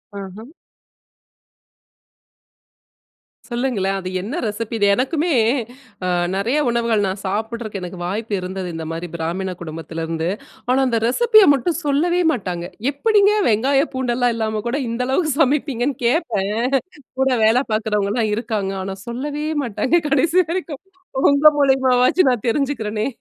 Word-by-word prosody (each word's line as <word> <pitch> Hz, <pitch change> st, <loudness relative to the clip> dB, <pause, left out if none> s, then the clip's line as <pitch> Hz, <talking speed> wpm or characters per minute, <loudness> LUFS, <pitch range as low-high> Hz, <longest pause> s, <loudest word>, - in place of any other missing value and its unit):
அஹ்ம் 200 Hz, +7 st, -8 dB, 3.0 s
சொல்லுங்களேன். 240 Hz, -6 st, -1 dB
அது 185 Hz, 0 st, -5 dB
என்ன 265 Hz, -, -4 dB
ரெசிபி? 215 Hz, +2 st, -4 dB
இத 205 Hz, -, +3 dB
எனக்குமே 300 Hz, +5 st, 0 dB, 0.7 s
அ, -, -, 0 dB, 0.3 s
நெறய 230 Hz, +9 st, 0 dB
உணவுகள், 230 Hz, -3 st, +1 dB
நான் 190 Hz, +1 st, -4 dB
சாப்பிட்றக்கு 220 Hz, +1 st, -3 dB
எனக்கு 180 Hz, 0 st, -7 dB
வாய்ப்பு 215 Hz, +3 st, -3 dB
இருந்தது, 185 Hz, 0 st, -5 dB
இந்த 160 Hz, -1 st, -5 dB
மாரி 165 Hz, +2 st, -5 dB
பிராமின 180 Hz, +3 st, -3 dB
குடும்பத்திலருந்து. 165 Hz, +1 st, -4 dB, 0.4 s
ஆனா, 260 Hz, +1 st, +3 dB
அந்த 230 Hz, -2 st, +1 dB
ரெசிப்பிய 435 Hz, -, +5 dB
மட்டும் 320 Hz, +6 st, -1 dB
சொல்லவே 345 Hz, +6 st, +2 dB
மாட்டாங்க. 180 Hz, -6 st, -4 dB, 0.3 s
எப்படிங்க, 410 Hz, +7 st, +3 dB, 0.2 s
வெங்காயம், 270 Hz, +7 st, +2 dB
பூண்டெல்லாம் 245 Hz, -2 st, 0 dB
இல்லாம 220 Hz, -1 st, -2 dB
கூட, 255 Hz, +4 st, -1 dB
இந்த 230 Hz, +2 st, -3 dB
அளவுக்கு 310 Hz, +3 st, +1 dB
சமைப்பீங்கன்னு 270 Hz, -2 st, +1 dB
கேப்பேன். 235 Hz, -, 0 dB, 0.7 s
கூட 265 Hz, -, +3 dB, 0.2 s
வேல 235 Hz, +4 st, +4 dB
பாக்குறவங்கலாம் 215 Hz, 0 st, 0 dB
இருக்காங்க. 215 Hz, -4 st, -2 dB
ஆனா, 190 Hz, 0 st, -5 dB
சொல்லவே 290 Hz, +5 st, -4 dB, 0.2 s
மாட்டாங்க, 245 Hz, +9 st, +1 dB
கடைசி 320 Hz, +6 st, +2 dB
வரைக்கும். 335 Hz, -5 st, -4 dB, 0.5 s
உங்க 285 Hz, +2 st, +5 dB
மூலியமாவாச்சும், 265 Hz, +2 st, +4 dB
நான் 245 Hz, -1 st, -2 dB
தெரிஞ்சுக்கிறேனே! 225 Hz, -6 st, -1 dB
235 Hz, 120 wpm, -20 LUFS, 200-280 Hz, 3.0 s, ரெசிப்பிய